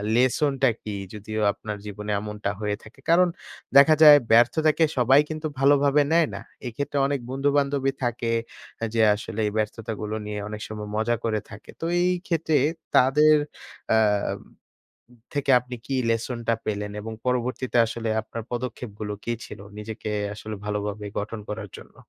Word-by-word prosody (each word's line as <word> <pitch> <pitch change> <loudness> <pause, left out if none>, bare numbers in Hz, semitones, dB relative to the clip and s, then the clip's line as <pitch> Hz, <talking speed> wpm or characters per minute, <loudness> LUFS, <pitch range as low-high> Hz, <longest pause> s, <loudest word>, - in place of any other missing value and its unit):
লেসনটা 135 +2 +3
কী? 105 -1 -4 0.2
যদিও 110 +1 -4
আপনার 105 -1 -6
জীবনে 105 +1 -5
এমনটা 105 -1 -4
হয়ে 105 -1 -1
থাকে। 115 +5 -16
কারণ 180 +2 +6 0.5
দেখা 150 +3 +8
যায় 150 -1 +11
ব্যর্থতাকে 155 +8 +4
সবাই 130 +3 +5
কিন্তু 155 0 -3
ভালোভাবে 140 +1 +4
নেয় 165 -1 +4
না। - - -6 0.3
এক্ষেত্রে 140 +4 -3
অনেক 140 -1 -1
বন্ধুবান্ধবই 140 0 +1
থাকে 120 -1 -1 0.5
এ - - +2
যে 115 - +2
আসলে 110 +1 -7
এই - - -2
ব্যর্থতাগুলো 110 0 -3
নিয়ে 105 0 -4
অনেক 105 0 -6
সময় 105 -1 -6
মজা 120 +2 +1
করে 110 -2 0
থাকে। 110 0 -12
তো - - -2 0.2
এই 180 +1 +3 0.2
ক্ষেত্রে 160 -3 0 0.4
তাদের 150 +4 +6 0.6
আ - - +5 1.4
থেকে 145 -1 +1
আপনি 125 +1 -8
কি 135 - -2
লেসনটা 115 0 -1
পেলেন? 105 -1 -3
এবং 110 +1 -6
পরবর্তীতে 125 0 -1
আসলে 115 0 -4
আপনার 115 +1 -7
পদক্ষেপগুলো 115 -4 -5
কী 120 - 0
ছিল - - -10 0.2
নিজেকে 110 0 -6 0.2
আসলে 110 +1 -7
ভালোভাবে 105 0 -3
গঠন 110 +2 -5
করার 105 -2 -6
জন্য? - - -16
115 Hz, 150 wpm, -25 LUFS, 105-140 Hz, 1.4 s, যায়